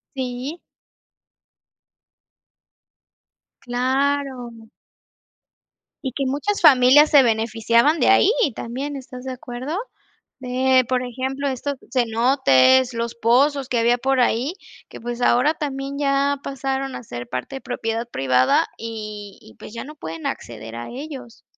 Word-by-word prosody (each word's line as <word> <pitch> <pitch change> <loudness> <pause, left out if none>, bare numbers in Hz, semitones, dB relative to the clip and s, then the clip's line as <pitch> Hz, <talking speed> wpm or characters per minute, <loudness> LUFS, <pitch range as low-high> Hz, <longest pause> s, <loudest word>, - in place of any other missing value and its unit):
Sí. 260 +5 -4 3.0
Claro. 255 -2 -2 1.3
Y 260 - -3
que 275 +1 -2
muchas 290 +10 -1
familias 285 0 +7
se 285 -3 +7
beneficiaban 230 +5 +2
de - - +3
ahí 390 - +5 0.3
también, 270 +5 -5
¿estás 255 -2 -9
de 260 - -4
acuerdo? 255 +6 -6 0.6
De, 255 0 +2
por 255 -1 +1
ejemplo, 265 +3 -3
estos 275 +2 -3 0.2
cenotes, 245 - +3
los 230 0 -3
pozos 265 +4 +2
que 245 - +1
había 240 +1 +3
por 265 +1 0
ahí, 250 +5 +1 0.4
que, - - -10
pues, 240 +1 -5
ahora 250 +5 +3
también 275 -2 -4
ya 280 0 +1
pasaron 270 0 -3
a - - -7
ser 120 - -7
parte 125 - -5
de - - -11
propiedad 230 -1 -3
privada 130 - +2
y 215 -3 -7
y, 110 - -17
pues, 210 - -12
ya 230 - -6
no 300 +2 -11
pueden 165 - -6
acceder 115 -1 -7
a 120 0 -7
ellos. 265 -3 -9
255 Hz, 130 wpm, -22 LUFS, 230-275 Hz, 3.0 s, familias